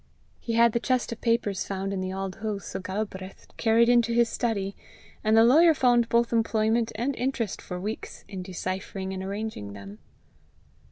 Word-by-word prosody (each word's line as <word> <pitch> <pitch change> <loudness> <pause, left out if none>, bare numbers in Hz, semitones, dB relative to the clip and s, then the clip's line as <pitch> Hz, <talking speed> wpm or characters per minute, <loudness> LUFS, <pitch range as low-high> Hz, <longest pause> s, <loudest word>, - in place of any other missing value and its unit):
He 230 - -4
had 235 0 +5
the 235 - 0
chest 255 0 0
of 230 - -6
papers 230 -4 0
found 195 0 -3
in 190 - -2
the 185 0 -3
Auld 195 0 -4
Hoose 215 -2 -5
o' - - -1
Galbraith 190 0 -5
carried 230 +1 +4
into 235 -1 +4
his 235 -1 +3
study, 200 -4 -2 0.5
and 220 +1 +4
the 225 - +8
lawyer 315 +7 +6
found 240 -3 +3
both 235 0 +2
employment 225 0 +1
and 250 +5 -1
interest 245 -5 -2
for 180 -1 -6
weeks 210 +4 -6
in 190 -2 -6
deciphering 190 +1 -4
and 190 - -4
arranging 195 - -5
them. 100 +1 -10
220 Hz, 175 wpm, -27 LUFS, 190-235 Hz, 0.5 s, the